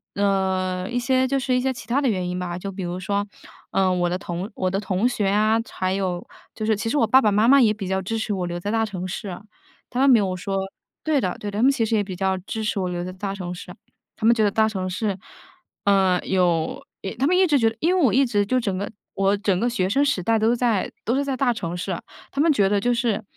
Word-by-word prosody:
呃， 190 -2 0
一 245 - -2
些 260 +1 +2
就 275 +1 0
是 255 -1 0
一 250 - +2
些 265 0 0
其 255 - -9
它 265 +4 +1
的 265 - +2
原 185 -4 -1
因 180 0 -3
吧， 175 -1 -4
就 195 +2 -5
比 190 0 -7
如 175 +1 -4
说， 200 +2 -1 0.5
呃， 190 -1 +2
我 175 -1 +1
的 180 - -1
同 185 +2 -5
我 185 - -1
的 195 - 0
同 195 +3 0
学 210 -5 -1
啊， 215 +2 +3
还 185 0 -2
有 185 -3 -2 0.3
就 215 - -3
是 220 -1 +2
其 225 +3 -3
实 295 - 0
我 230 - +4
爸 260 +5 +5
爸 210 - +3
妈 215 +3 +3
妈 275 +1 +7
也 220 -3 +5
比 205 -3 -4
较 190 0 0
支 225 +4 -3
持 220 -1 -2
我 180 -2 -2
留 175 0 -4
在 205 +4 -3
大 225 0 +1
城 185 -4 -4
市， 190 -1 -5 0.5
他 250 - -2
们 275 0 +5
没 245 - +7
有 185 -2 -1
说 195 +2 -3 0.5
对 300 -4 +2
的， 180 - -2
对 205 - -4
的。 205 - -3
他 - - +2
们 275 - +6
其 230 -5 0
实 225 - 0
也 205 - +2
比 190 -2 -6
较 190 0 0
支 220 +4 -5
持 210 -2 -1
我 185 - -1
留 175 0 -3
在 185 - -5
大 195 +1 -4
城 180 -2 -5
市， 180 0 -9 0.4
他 220 - -4
们 235 - +7
觉 220 - +2
得 205 - +4
大 220 +1 +3
城 190 -3 -3
市， 195 +1 -2 0.7
呃， 190 -2 +4
有 175 -4 +1 0.2
一 190 - -4
他 265 - 0
们 365 +3 +3
一 375 - +5
直 295 -4 +3
觉 225 -1 +4
得 225 - -10
因 350 +4 +2
为 365 - +2
我 245 - +4
一 270 +2 +4
直 205 -4 +1
就 255 +4 +1
整 200 -6 -2
个 200 +3 -4 0.2
我 195 +1 +2
整 200 -2 +1
个 240 - +1
学 185 -6 0
生 275 +7 +3
时 275 -10 +1
代 225 +3 +2
都 225 +2 +3
在 235 -5 0
都 240 - +1
是 280 - +1
在 270 -2 -2
大 245 -2 +2
城 175 -6 -4
市。 180 -1 -3 0.3
他 280 - 0
们 325 0 +4
觉 200 -6 +3
得 205 -1 +2
就 245 +4 +1
是， 235 -3 0
205 Hz, 300 characters per minute, -23 LUFS, 185-235 Hz, 0.7 s, 妈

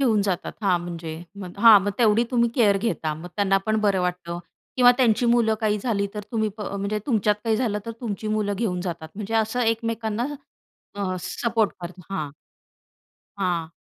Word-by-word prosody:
घेऊन 225 -6 +3
जातात. 185 -3 -2
हां, 185 -3 +3
म्हणजे 170 -2 -6 0.3
मग 180 +2 -9
हां, 220 -1 +9
मग 205 - 0
तेवढी 225 -1 +4
तुम्ही 235 -2 +3
केअर 210 -6 +4
घेता 190 -7 -1
मग 165 +3 -9
त्यांना 195 -1 +3
पण 215 0 +2
बरं 200 -3 +2
वाटतं 180 -1 -3 0.4
किंवा 245 -1 +7
त्यांची 245 -2 +3
मुलं 230 -2 +3
काही 210 -1 +1
झाली 200 -3 0
तर, 210 - -3
तुम्ही 220 -2 +1
प - - -10
म्हणजे 200 +1 -2
तुमच्यात 215 -5 +2
काही 225 -1 +2
झालं 220 -4 0
तर, - - -3
तुमची 215 -2 -4
मुलं 215 -1 0
घेऊन 190 -5 -1
जातात 170 -3 -5
म्हणजे 210 +2 -5
असं 225 +2 +1
एकमेकांना 225 0 -1 0.7
अ, 195 -2 -2
सपोर्ट 220 +4 0
करता, 180 +2 -8
हां. 155 -6 -2 1.1
हां. 175 -4 -1
210 Hz, 180 wpm, -24 LUFS, 185-225 Hz, 1.1 s, हां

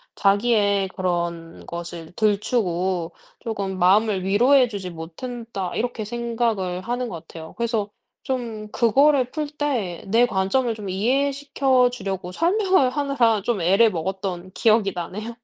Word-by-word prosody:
'자기의 200 -1 +2
그런 170 -3 -3
것을 170 -1 -7
들추고 190 -5 0 0.3
조금 200 -5 -3
마음을 195 +1 +3
위로해 245 +7 +4
주지 195 -4 -5
못했다.' 195 +4 -6
이렇게 230 -2 -2
생각을 225 -6 -2
하는 245 +3 -2
것 165 -1 -8
같아요. 160 -1 -10
그래서 225 -3 -1 0.3
좀 230 -5 -4
그거를 265 +2 +3
풀 305 +2 -3
때 255 - -2
내 230 +5 +4
관점을 230 +3 0
좀 205 -3 -7
이해시켜 265 +3 +2
주려고 190 -6 -5
설명을 370 - +2
하느라 255 -6 +1
좀 220 -6 -1
애를 195 +6 +4
먹었던 185 +1 -4
기억이 215 -4 +3
나네요. 210 +7 -5
215 Hz, 290 characters per minute, -23 LUFS, 185-245 Hz, 0.3 s, 위로해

